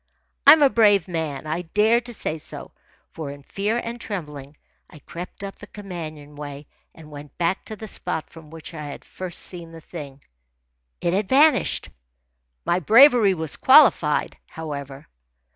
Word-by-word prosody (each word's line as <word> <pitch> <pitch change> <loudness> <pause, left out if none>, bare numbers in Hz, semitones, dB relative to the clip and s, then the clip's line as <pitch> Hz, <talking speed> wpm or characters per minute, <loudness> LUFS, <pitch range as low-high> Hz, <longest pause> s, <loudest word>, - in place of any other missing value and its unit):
I 285 - +13
am 310 -2 +4
a 280 - +6
brave 205 -6 +4
man. 160 -5 -4
I 160 +3 -2
dare 210 +7 +2
to 240 0 -9
say 160 -8 -4
so; - - -10 0.4
for 155 -3 -7
in 140 0 -10
fear 205 +9 -2
and 235 0 -5
trembling 150 -7 -7 0.3
I - - -14
crept 175 +6 -9
up 195 0 -7
the 210 - -12
companion 160 -8 -9
way 145 0 -8 0.3
and 155 -2 -14
went 145 0 -11
back 175 +3 -1
to 215 - -7
the 220 +1 -9
spot 160 -5 -2
from 160 -2 -15
which 165 +1 -10
I 155 - -7
had 145 - -9
first 185 -2 -6
seen 170 -2 -6
the 165 - -10
thing. 145 -4 -10 0.8
It 170 - 0
had 195 0 -1
vanished. 300 +3 +3 0.8
My 175 - +1
bravery 225 - +6
was 160 -4 -2
qualified, 255 - +4
however. 145 -2 -7
170 Hz, 165 wpm, -23 LUFS, 150-210 Hz, 0.8 s, I